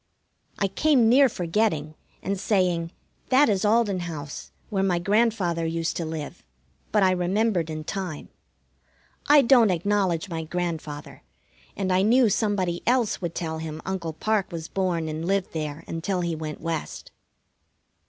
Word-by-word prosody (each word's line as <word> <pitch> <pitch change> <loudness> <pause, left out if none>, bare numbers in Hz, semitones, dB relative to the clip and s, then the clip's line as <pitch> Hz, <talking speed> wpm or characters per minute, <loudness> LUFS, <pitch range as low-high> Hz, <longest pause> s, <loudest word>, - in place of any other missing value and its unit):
I 200 - +1
came 245 +3 +3
near 265 +2 +6
forgetting, 170 -5 -1 0.3
and 195 0 -2
saying, 180 -5 +1 0.4
"That 265 +1 +5
is 195 -3 +1
Alden 210 -3 +2
house, 155 -5 -6 0.2
where 195 -2 0
my 190 -2 +2
grandfather 200 -3 +1
used 165 0 -2
to 170 - -2
live," 155 -2 -6 0.5
but 210 -2 +3
I 185 - +5
remembered 185 -1 0
in 155 0 -5
time. 180 -3 -5 1.0
I 290 -1 +7
don't 235 -3 +6
acknowledge 185 -1 0
my 165 -3 -4
grandfather, 160 -3 -5 0.6
and 190 -2 0
I 185 - +3
knew 235 +3 +4
somebody 190 -5 0
else 240 -5 +2
would 170 -2 -4
tell 160 -2 -3
him 160 -1 -6
Uncle 180 -4 -3
Parke 210 +3 -1
was 165 -2 -5
born 180 -4 -1
and 155 +1 -4
lived 195 -1 0
there 155 -2 -4
until 180 +3 -2
he 170 -1 -1
went 155 -1 -6
West. 165 -1 -4
180 Hz, 150 wpm, -25 LUFS, 165-205 Hz, 1.0 s, I